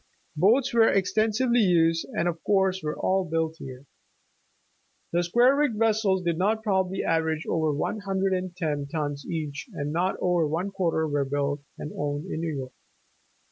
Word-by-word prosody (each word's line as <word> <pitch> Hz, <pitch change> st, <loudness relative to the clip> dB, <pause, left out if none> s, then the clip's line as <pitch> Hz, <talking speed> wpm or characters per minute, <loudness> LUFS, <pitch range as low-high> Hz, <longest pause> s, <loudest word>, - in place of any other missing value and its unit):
Boats 230 Hz, -, +3 dB
were 225 Hz, -1 st, +5 dB
extensively 220 Hz, +5 st, +2 dB
used 165 Hz, -5 st, +3 dB
and 170 Hz, -, +1 dB
of 170 Hz, -1 st, -3 dB
course 190 Hz, -2 st, +2 dB
were 150 Hz, -1 st, -3 dB
all 190 Hz, 0 st, +1 dB
built 165 Hz, -1 st, -2 dB
here. 130 Hz, +1 st, -9 dB, 1.3 s
The 175 Hz, -, +3 dB
square 240 Hz, +10 st, +4 dB
rigged 285 Hz, -6 st, +1 dB
vessels 215 Hz, -4 st, +2 dB
did 170 Hz, -1 st, -1 dB
not 215 Hz, +4 st, +1 dB
probably 190 Hz, -3 st, 0 dB
average 160 Hz, -1 st, 0 dB
over 160 Hz, -2 st, 0 dB
one 150 Hz, +9 st, -2 dB
hundred 195 Hz, -1 st, -1 dB
and 185 Hz, -1 st, -3 dB
ten 150 Hz, -4 st, -2 dB
tons 145 Hz, -2 st, -4 dB
each 150 Hz, -, -4 dB
and 145 Hz, -3 st, -3 dB
not 180 Hz, +3 st, 0 dB
over 175 Hz, -3 st, +2 dB
one 170 Hz, +6 st, -2 dB
quarter 170 Hz, -4 st, 0 dB
were 145 Hz, -1 st, 0 dB
built 145 Hz, +1 st, -1 dB, 0.2 s
and 150 Hz, -, -6 dB
owned 145 Hz, +2 st, -3 dB
in 160 Hz, -, -3 dB
New 165 Hz, -1 st, -2 dB
York. 130 Hz, -1 st, -6 dB
175 Hz, 170 wpm, -26 LUFS, 155-195 Hz, 1.3 s, were